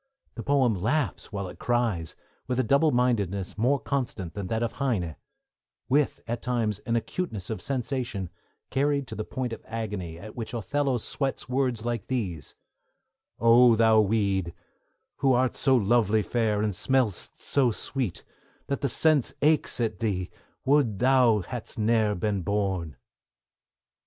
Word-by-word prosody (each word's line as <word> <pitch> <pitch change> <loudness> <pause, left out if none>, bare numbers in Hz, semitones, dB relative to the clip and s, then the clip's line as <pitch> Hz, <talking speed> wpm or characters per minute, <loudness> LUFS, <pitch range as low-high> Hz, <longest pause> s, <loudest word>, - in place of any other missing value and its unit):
The 115 - -6
poem 135 -3 +3
laughs 120 - -1
while 100 -2 -3
it - - -11
cries, 115 -10 0 0.3
with 125 0 -1
a - - +3
double 140 +7 +4
mindedness 105 -8 0
more 125 +6 +2
constant 125 - -3
than 100 -2 -4
that 110 +4 -1
of 115 - -1
Heine; 95 - 0 0.7
with, 145 +2 +2
at 120 0 -3
times, 115 -5 -1
an 115 - +1
acuteness 115 - -3
of 110 - -4
sensation 125 -8 -3 0.4
carried 140 0 +1
to - - -6
the 110 - -3
point 125 0 -4
of - - -7
agony 105 -7 -5
at 105 +5 -10
which 115 0 -5
Othello 135 +3 0
sweats 135 +4 -3
words 125 -3 0
like 120 -1 -2
these: 95 - -3 0.8
O 115 +1 +6
thou 110 -1 +5
weed, 100 -4 0 0.6
Who 135 -1 +3
art 125 0 +2
so 135 -2 +3
lovely 110 -1 +3
fair, 110 -3 0
and 105 -1 0
smell'st 125 0 0
so 135 -3 +2
sweet 120 -2 -3 0.4
That 140 - -3
the 140 - +1
sense 155 -1 +2
aches 150 -3 +3
at 110 -6 -1
thee, 95 -5 -1 0.3
would 135 -7 +3
thou 125 -4 +4
hadst 120 +5 -7
ne'er 110 -1 +2
been 100 +1 -1
born! 95 -4 -1
115 Hz, 150 wpm, -27 LUFS, 105-130 Hz, 0.8 s, O